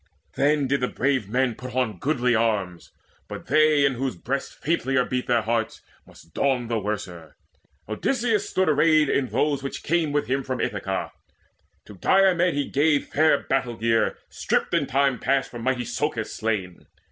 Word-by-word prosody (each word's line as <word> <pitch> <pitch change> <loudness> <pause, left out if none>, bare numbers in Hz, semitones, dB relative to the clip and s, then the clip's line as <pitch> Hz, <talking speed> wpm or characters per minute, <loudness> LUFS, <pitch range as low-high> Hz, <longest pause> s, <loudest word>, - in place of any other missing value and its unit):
Then 145 0 +2
did 140 +1 0
the 125 - +1
brave 130 -7 -1
man 125 +1 +1
put 125 +2 -9
on 115 -8 -1
goodly 125 -4 +1
arms; 105 -6 -1 0.4
But - - -8
they 155 -2 +4
in 140 - +2
whose 130 -3 -3
breasts 135 +10 -3
faintlier 135 -5 0
beat 125 0 -3
their 120 -2 +2
hearts 115 0 -2 0.2
Must 80 - -18
don 125 -4 0
the 115 -2 0
worser. 95 -7 -5 0.5
Odysseus 225 - 0
stood 190 0 +1
arrayed 155 0 +4
In 135 -2 +1
those 145 +2 0
which 135 - -6
came 165 -2 +1
with 145 -3 0
him 135 +4 -1
from 130 -1 -4
Ithaca: 95 -2 -3 0.7
To - - -12
Diomede 180 - +3
he 145 -1 -1
gave 145 +1 +1
fair 155 -1 +3
battle 125 -3 -1
gear 115 0 +1
Stripped - - -1
in - - +1
time 135 -2 +1
past 135 0 0
from 120 - -7
mighty 125 0 0
Socus 120 -1 -3
slain. 100 -6 -3
130 Hz, 170 wpm, -24 LUFS, 115-145 Hz, 0.7 s, they